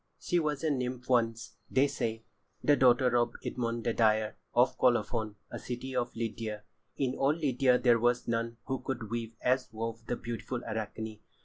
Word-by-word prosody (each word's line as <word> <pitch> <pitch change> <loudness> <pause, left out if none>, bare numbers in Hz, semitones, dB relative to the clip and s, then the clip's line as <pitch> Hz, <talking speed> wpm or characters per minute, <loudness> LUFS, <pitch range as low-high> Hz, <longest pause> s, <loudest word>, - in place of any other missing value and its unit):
She 175 - +1
was 150 -2 -1
a 155 - +2
nymph 125 -1 -3
once, 115 -2 +1
they 135 +2 +4
say—the 115 +4 -2
daughter 125 -1 +4
of 120 0 +1
Idmon 115 -1 -2
the 115 - +1
dyer, 110 -1 +2 0.2
of 120 +2 +3
Colophon, 110 -3 +2 0.2
a - - -5
city 130 +1 -5
of 120 -1 -1
Lydia. 110 -2 -4 0.3
In 130 -2 0
all 135 +3 +2
Lydia 135 -5 +3
there 120 -2 +4
was 120 +1 +2
none 115 0 -1
who 130 -1 -2
could 120 -4 -4
weave 115 -1 -3
as 130 +1 +1
wove 115 +1 -4
the 120 - 0
beautiful 120 +1 -5
Arachne. 110 0 -4
120 Hz, 170 wpm, -31 LUFS, 115-130 Hz, 0.3 s, they